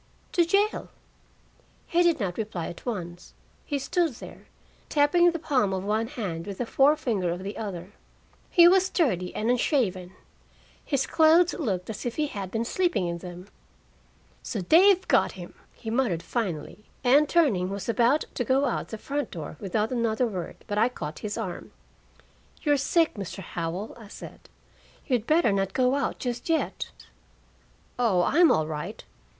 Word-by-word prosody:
"To 345 - +3
jail." 400 +5 +1 1.0
He 345 - +2
did 345 -4 +3
not 190 -3 -3
reply 205 -6 -3
at 170 - -11
once. 175 -6 -6 0.3
He 290 - -2
stood 335 +2 0
there, - - -12 0.4
tapping 315 +4 +4
the 335 - -2
palm 255 - +1
of 190 0 -2
one 215 +3 0
hand 200 - -5
with 200 -2 -6
the 245 - -2
forefinger 250 - +2
of 175 +2 -4
the 200 +2 -5
other. 190 -4 -6 0.6
He 345 -1 +7
was 375 +1 +4
dirty 185 - 0
and 220 +3 +1
unshaven. 205 - 0 0.7
His 275 -2 0
clothes 330 +2 +4
looked 195 - -2
as 210 - -7
if 240 - -4
he 305 - +1
had 200 -9 -5
been 225 +3 -2
sleeping 350 - 0
in 170 0 -3
them. 180 +2 -10 0.9
"So 210 - -4
they've 370 - +5
got - - +3
him!" - - -10 0.2
he 225 - -7
muttered 225 -9 0
finally, 190 -4 -4 0.2
and 285 +4 +5
turning, 230 - +2
was 200 0 -5
about 240 +5 +2
to 245 - -1
go 265 +4 +2
out - - -2
the 220 - -6
front 285 +5 -3
door 155 -3 -7
without 210 +3 -1
another 235 -1 +1
word, 185 -7 -5
but 205 0 -2
I 230 +3 +4
caught 155 -10 -7
his 210 0 -4
arm. 190 -6 -5 0.9
"You're 295 -3 +3
sick, 325 +4 +2
Mr. 195 -1 -6
Howell," 170 +5 -4
I 220 - -12
said. - - -12 0.6
"You'd 245 -6 0
better 315 -7 +4
not 195 -1 0
go 255 0 +2
out 280 -1 -1
just 240 +3 -4
yet." 325 -1 -1 1.1
"Oh, 200 -8 +3
I'm 330 - +5
all 155 - +2
right." 150 -1 -6
230 Hz, 165 wpm, -26 LUFS, 190-290 Hz, 1.1 s, He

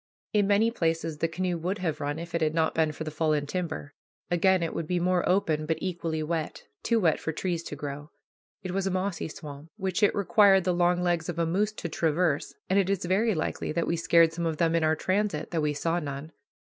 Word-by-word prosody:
In 205 -2 +3
many 210 +3 +3
places 165 -6 -1
the 165 - +2
canoe 175 +1 -2
would 180 +5 -2
have 170 -5 -2
run 145 +1 -2
if 170 +1 -7
it 170 - 0
had 155 0 +1
not 160 -1 +2
been 160 -1 +2
for 150 +1 -6
the 155 - -5
fallen 155 -1 0
timber. 155 -3 -4 0.4
Again 185 +1 +3
it 165 - -2
would 165 - -3
be 180 +1 0
more 180 0 +2
open, 160 -5 +1
but 160 - 0
equally 165 -4 -2
wet, 160 0 -3 0.2
too 230 -1 +2
wet 165 -6 +2
for 160 - -3
trees 170 +1 -2
to - - -5
grow. 145 +1 -6 0.5
It 185 - -4
was 195 +1 -1
a - - +2
mossy 185 -2 -2
swamp, 150 0 -9
which 190 -3 -2
it 205 - +4
required 200 -1 +5
the 180 0 +1
long 175 0 +2
legs 175 -1 0
of 170 - -4
a 170 - +1
moose 200 +6 0
to 175 - -5
traverse, 160 -1 0
and 190 +2 +3
it 195 -1 +1
is 195 -3 0
very 200 +4 +2
likely 155 - -2
that 170 +1 0
we 170 - 0
scared 165 0 +4
some 170 0 -2
of 160 -1 -2
them 165 0 +2
in 165 -1 +2
our 155 0 +3
transit, 185 -1 -1
though 165 -3 0
we 150 -1 0
saw 165 +4 0
none. 145 0 -6
170 Hz, 240 wpm, -27 LUFS, 155-185 Hz, 0.5 s, required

